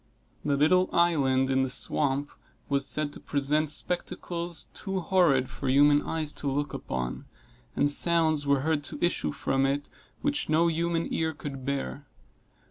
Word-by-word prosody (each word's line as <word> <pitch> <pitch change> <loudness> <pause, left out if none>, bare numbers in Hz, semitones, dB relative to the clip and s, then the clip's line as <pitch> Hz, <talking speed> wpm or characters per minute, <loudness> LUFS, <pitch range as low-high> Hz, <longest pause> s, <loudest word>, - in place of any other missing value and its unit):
The 140 -1 +1
little 180 +6 +3
island 135 -6 +2
in 135 0 +2
the 130 - 0
swamp 140 +1 0 0.4
was 140 -1 +1
said 150 -1 +1
to - - -9
present 150 +2 0
spectacles 175 +1 -3
too 195 -2 -3
horrid 165 -9 +3
for 140 - -6
human 145 +2 +5
eyes 155 -2 -2
to 140 - -1
look 145 0 -2
upon, 60 -1 -4 0.5
and 145 - +2
sounds 160 -2 +2
were 140 -1 +3
heard 155 0 0
to - - -6
issue 175 - 0
from 135 -1 -1
it 140 +1 -2 0.3
which 290 - 0
no 165 +2 +3
human 165 0 -1
ear 160 -1 -1
could 135 -3 -7
bear. 140 0 -3
145 Hz, 155 wpm, -27 LUFS, 140-165 Hz, 0.5 s, human